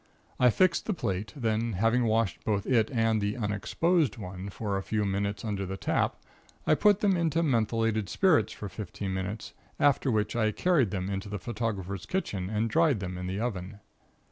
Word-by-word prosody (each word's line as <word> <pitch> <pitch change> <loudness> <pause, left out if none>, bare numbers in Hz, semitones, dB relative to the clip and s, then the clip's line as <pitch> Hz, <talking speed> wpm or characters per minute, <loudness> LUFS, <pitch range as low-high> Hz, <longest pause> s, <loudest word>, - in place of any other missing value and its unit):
I 125 - +6
fixed 170 +7 +2
the 210 - 0
plate, 95 - -2
then 115 -3 0
having 115 +5 +2
washed 110 -2 0
both 100 -2 0
it 115 -4 +3
and 115 -4 +1
the 100 +2 -1
'unexposed' 120 - +1
one 95 -1 -6
for 100 0 -3
a 95 - -1
few 105 +1 -1
minutes 100 +2 -2
under 100 -3 -2
the 95 0 -4
tap, - - 0 0.5
I - - +4
put 205 +5 +4
them 200 -2 +3
into 165 -1 +1
methylated 115 - +1
spirits 185 - +3
for 105 - -6
fifteen 95 0 -5
minutes, 95 +3 -4 0.3
after 140 -1 +3
which 105 -2 0
I 110 -2 +1
carried 160 - +2
them 95 -1 -3
into 100 +1 -4
the 105 - -3
photographer's 100 -5 -4
kitchen 100 - -2
and 110 +2 0
dried 150 0 +3
them 90 -2 -4
in 90 0 -5
the 95 +2 -3
oven. 100 -3 -4
110 Hz, 185 wpm, -29 LUFS, 100-125 Hz, 0.5 s, I